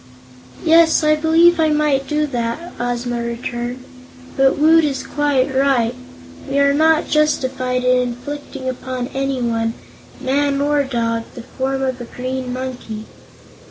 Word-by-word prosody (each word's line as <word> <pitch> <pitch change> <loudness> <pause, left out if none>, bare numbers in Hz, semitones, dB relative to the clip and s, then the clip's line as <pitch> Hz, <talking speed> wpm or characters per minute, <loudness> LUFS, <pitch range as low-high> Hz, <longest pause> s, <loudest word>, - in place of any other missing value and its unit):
"Yes; 325 0 +5
I 305 0 +4
believe 330 +2 +4
I 315 -1 +3
might 295 -3 +1
do 300 0 0
that," 250 +5 -4
Ozma 240 0 -2
returned; 240 +1 -4 0.5
"but 270 0 +3
Woot 320 +2 +5
is 280 -3 -1
quite 285 -2 0
right; 260 -3 +2 0.6
we 275 - -1
are 280 0 +4
not 315 +2 +3
justified 260 -4 0
in 250 0 +3
inflicting 260 +2 -6
upon 255 0 -4
anyone 240 -4 -1 0.4
man 280 +1 0
or 290 0 +2
dog 230 -3 -1
the 240 - -8
form 270 +2 -3
of 260 -1 -2
a - - -5
green 255 +1 -5
monkey. 250 -4 -6
265 Hz, 135 wpm, -19 LUFS, 245-295 Hz, 0.6 s, Yes